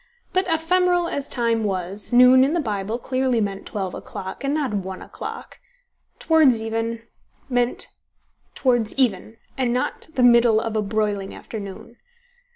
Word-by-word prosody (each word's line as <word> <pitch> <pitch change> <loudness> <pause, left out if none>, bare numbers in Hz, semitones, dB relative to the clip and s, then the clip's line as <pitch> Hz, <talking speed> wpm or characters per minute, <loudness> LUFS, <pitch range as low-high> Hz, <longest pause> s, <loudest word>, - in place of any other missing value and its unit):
But 370 +1 +1
ephemeral 350 +1 +2
as 285 -3 -3
Time 230 -2 0
was, 195 +1 -3
noon 250 +1 +7
in 280 +4 +1
the 345 - +1
Bible 215 -4 -2
clearly 255 -1 0
meant 200 -2 -3
twelve 190 -3 -4
o'clock, 190 +3 -7
and 275 - 0
not 290 -6 -1
one 190 -2 -4
o'clock: - - -8 0.6
towards 310 -8 +4
even, 225 +1 -3 0.5
meant 245 -1 0 0.7
towards 240 -5 +1
even, 225 -4 0 0.2
and 250 -2 +1
not 250 +1 -2
the 255 - +2
middle 235 -2 +6
of 225 0 -3
a 215 - +2
broiling 205 -1 -2
afternoon. 210 +2 -9
235 Hz, 145 wpm, -22 LUFS, 210-260 Hz, 0.7 s, noon